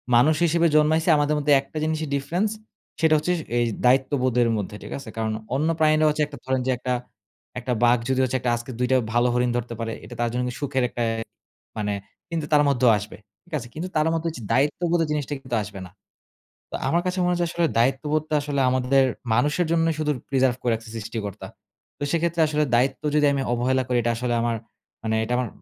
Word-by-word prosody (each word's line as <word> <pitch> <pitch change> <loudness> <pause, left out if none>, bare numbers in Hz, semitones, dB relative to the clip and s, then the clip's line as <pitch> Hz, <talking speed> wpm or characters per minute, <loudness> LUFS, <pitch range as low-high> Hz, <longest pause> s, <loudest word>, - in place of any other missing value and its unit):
মানুষ 150 +6 +5
হিসেবে 170 +1 +3
জন্মাইছি 155 +2 +3
আমাদের 145 +1 +1
মধ্যে 150 0 +1
একটা 140 +3 -10
জিনিসই 155 0 -1
ডিফরেন্স 175 +10 0 0.5
সেটা 160 -1 +4
হচ্ছে 155 +4 -1
স - - -4 0.2
এই 120 - +3 0.2
দায়িত্ববোধের 130 -2 +3
মধ্যে, 105 0 -4
ঠিক - - -9
আছে? 135 -4 -9
কারণ 110 -1 -1 0.2
অন্য 150 +4 +1
প্রাণীরা 155 0 +4
হচ্ছে 150 0 +1
একটা 145 -1 -10
ধরেন 130 0 0
যে - - +3
একটা, 125 +1 -2 0.7
একটা 125 +1 -2
বাঘ 120 +1 +5
যদি 130 0 +1
হচ্ছে 130 0 0
একটা 120 -1 0
আজকে 120 +2 -6
২ 125 - +1
টা - - +5 0.2
ভালো 120 +1 +3
হরিণ 125 0 +2
ধরতে 120 0 -4
পারে 115 0 -3
এটা - - -10
তার 120 - +1
জন্য 125 - 0
কি - - -6
সুখের 130 -2 0
একটা 120 - -5
অ্যা 115 0 -2 0.6
মানে 105 -1 -1 0.4
কিন্তু 165 -3 -2
তার 150 -1 +6
মধ্যেও 125 -3 +4
আসবে। 105 +1 -8 0.3
ঠিক 175 - -25
আছে? 120 - -9
কিন্তু 170 +4 -4
তার 155 +1 +3
মত 165 - -1
এইযে 125 -7 -9
দায়িত্ববোধের 165 +4 +1
জিনিসটা 150 -1 -2
কিন্তু 130 -3 -3
আসবে 100 -1 -9
না। 90 - -14 0.8
তো - - -4
আমার 170 - +2
কাছে 185 +1 -1
মনে 180 - +2
হয় 175 - -2
যে - - +2
আসলে 170 0 +1
দায়িত্ববোধটা 150 +5 +1
আসলে 145 -1 -1
আমাদের 130 +1 +3 0.3
মানুষের 150 +9 +2
জন্যই 165 -1 +2
শুধু 150 -1 +1 0.2
প্রিজার্ভ 130 -2 +2
করে 120 - +1
রাখছে 115 0 -5
সৃষ্টিকর্তা। 110 -2 -5 0.5
তো - - -5
সেক্ষেত্রে 170 0 +1
আসলে 150 0 +1
দায়িত্ব 130 +3 +1
যদি 150 -1 +4
আমি 140 - 0
অবহেলা 130 +2 +1
করি 125 -1 +1
এটা 120 - +1
আসলে 120 0 -1
আমার 120 0 0 0.5
মানে 110 0 0
এটা 120 - -2
আমার 125 -1 0
135 Hz, 210 wpm, -24 LUFS, 120-155 Hz, 0.8 s, তার